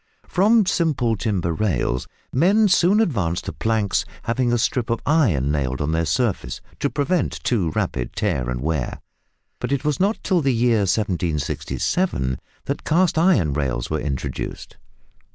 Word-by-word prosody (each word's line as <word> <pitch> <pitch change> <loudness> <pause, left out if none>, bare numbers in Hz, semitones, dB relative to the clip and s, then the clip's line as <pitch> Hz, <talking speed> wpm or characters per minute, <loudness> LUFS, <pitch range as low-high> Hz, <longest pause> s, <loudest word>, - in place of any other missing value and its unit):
From 210 +3 +4
simple 145 -11 +1
timber 95 -5 -1
rails 80 - -1 0.3
men 195 +10 +4
soon 185 +3 +4
advanced 100 - 0
to - - -4
planks 110 -3 0 0.2
having 120 +1 0
a 120 - +3
strip 120 0 0
of 115 - 0
iron 110 - +2
nailed 65 -3 -1
on 75 +1 -1
their 80 0 0
surface 105 - -1 0.2
to - - 0
prevent 155 +2 0
too 100 -9 +1
rapid 60 - -2
tear 70 - -1
and 60 -1 -3
wear, 75 -3 -2 0.6
but - - -3
it 140 +1 -1
was 150 -2 0
not 200 +4 +2
till 185 -4 +2
the 135 -3 +1
year 115 -1 +3
1767 85 - -1 0.3
that - - -3
cast 165 0 +2
iron 120 - +3
rails 65 -4 -2
were 80 - 0
introduced. 70 -2 -4
110 Hz, 150 wpm, -22 LUFS, -, 0.6 s, From